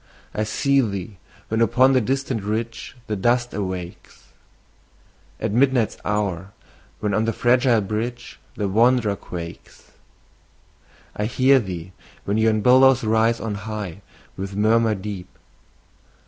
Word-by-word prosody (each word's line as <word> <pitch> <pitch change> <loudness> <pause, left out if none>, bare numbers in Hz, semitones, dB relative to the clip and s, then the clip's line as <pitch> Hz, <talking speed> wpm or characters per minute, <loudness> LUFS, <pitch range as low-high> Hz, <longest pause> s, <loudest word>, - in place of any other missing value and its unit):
I 110 - -1
see 140 +5 +2
thee, 100 -3 -4 0.3
when 110 +1 0
upon 130 +4 +4
the 130 - +4
distant 130 -1 -1
ridge 115 +5 -4
The 105 - -3
dust 120 +5 +1
awakes; 95 -3 -6 1.1
At - - -2
midnight's 125 -1 +2
hour, 100 -2 -2 0.5
when 105 -1 -1
on 110 +3 +1
the 115 - +1
fragile 120 -1 +3
bridge 115 +4 -4 0.2
The 105 - -2
wanderer 115 +1 +3
quakes. 85 -3 -10 1.2
I 105 - -2
hear 130 +4 +4
thee, 90 -5 -6 0.3
when 105 +2 0
yon 110 -1 +2
billows 130 +2 +5
rise 110 +1 +2
on 110 -2 -3 0.2
high, 100 -3 -5 0.3
With 95 +1 -6
murmur 110 +1 +3
deep. 95 -2 -6
110 Hz, 125 wpm, -22 LUFS, 100-120 Hz, 1.2 s, billows